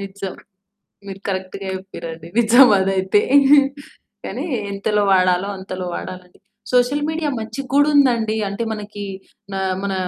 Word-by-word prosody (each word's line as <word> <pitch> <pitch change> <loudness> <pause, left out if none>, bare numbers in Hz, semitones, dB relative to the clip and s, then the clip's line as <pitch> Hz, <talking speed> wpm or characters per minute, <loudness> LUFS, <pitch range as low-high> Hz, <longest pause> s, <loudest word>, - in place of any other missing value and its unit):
నిజం 195 -1 -6 0.7
మీరు 195 -1 -7
కరెక్ట్‌గా 190 0 -4
చెప్పిరండీ. 165 -4 -8
నిజం 240 +3 +7
అదైతే. 190 +1 +2 1.0
కానీ 270 +7 -4 0.3
ఎంతలో 205 +1 0
వాడాలో 185 +1 +3
అంతలో 185 -1 -6
వాడాలది. 180 -1 -9 0.3
సోషల్ 250 +4 +2
మీడియా 315 -1 -1
మంచిగ 260 +5 -6
గూడుందండి. 275 -7 +3
అంటే 200 +4 -3
మనకి 205 -1 -7 0.5
నా 195 - -2 0.2
మన 200 -1 -1
200 Hz, 115 wpm, -20 LUFS, 190-240 Hz, 1.0 s, నిజం